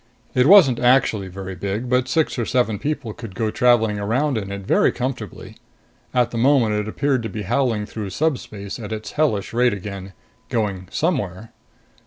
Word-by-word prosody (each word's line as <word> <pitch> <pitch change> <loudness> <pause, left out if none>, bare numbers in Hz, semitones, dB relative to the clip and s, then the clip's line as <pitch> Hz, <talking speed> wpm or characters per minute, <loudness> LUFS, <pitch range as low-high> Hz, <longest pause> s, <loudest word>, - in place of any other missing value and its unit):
It 125 +1 +3
wasn't 165 -11 +7
actually 120 -5 +3
very 95 +1 -7
big, 100 +6 -3
but 125 0 +1
six 155 -1 0
or 115 - 0
seven 120 -5 +1
people 145 -7 -3
could 110 -5 -9
go 110 0 -1
traveling 115 -4 +3
around 130 +8 0
in 100 -3 -3
it 100 0 -5
very - - +3
comfortably. 125 -5 -5 0.5
At 125 -2 +1
the 115 - -3
moment 125 -4 +3
it 105 0 -1
appeared 135 +3 0
to 115 - -4
be 105 +1 -5
howling 110 0 0
through 105 -2 -6
subspace 105 -5 -3
at 105 -2 -7
its 110 0 -5
hellish 135 -12 0
rate 120 -1 +3
again, 100 -1 -7 0.4
going 100 -5 -2
somewhere. 110 - -2
115 Hz, 175 wpm, -21 LUFS, 100-130 Hz, 0.5 s, wasn't